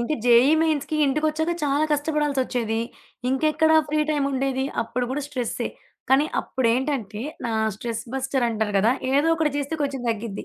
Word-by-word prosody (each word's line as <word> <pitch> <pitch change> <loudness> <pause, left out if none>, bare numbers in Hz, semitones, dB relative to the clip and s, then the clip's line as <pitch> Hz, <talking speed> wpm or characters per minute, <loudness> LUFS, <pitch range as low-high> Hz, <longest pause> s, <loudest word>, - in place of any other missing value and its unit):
ఇంకీ 240 +6 -1
JEE 245 +4 +6
మెయిన్స్‌కి 310 -1 0
ఇంటికొచ్చాక 310 +4 0
చాలా 290 +2 +2
కష్టపడాల్సొచ్చేది. 275 -7 0 0.5
ఇంకెక్కడ 310 +3 +2 0.2
ఫ్రీ 305 +1 +1
టైమ్ 290 -2 +1
ఉండేది 265 0 0 0.2
అప్పుడు 245 +2 -3
గూడా 285 +3 -2
స్ట్రెస్సే. 250 -5 -3 0.4
కానీ, 275 +3 +5
అప్పుడేంటంటే 245 -3 -1 0.2
నా 230 - -2 0.2
స్ట్రెస్ 230 0 -4
బస్టర్ 265 -1 0
అంటారు 215 -2 -2
గదా! 220 +5 +4 0.2
ఏదో 290 +4 +3
ఒకటి 310 -3 +1
జేస్తే 290 +2 -2
కొంచెం 275 -3 -2
తగ్గిద్ది. 225 -2 -4
270 Hz, 145 wpm, -24 LUFS, 235-295 Hz, 0.5 s, JEE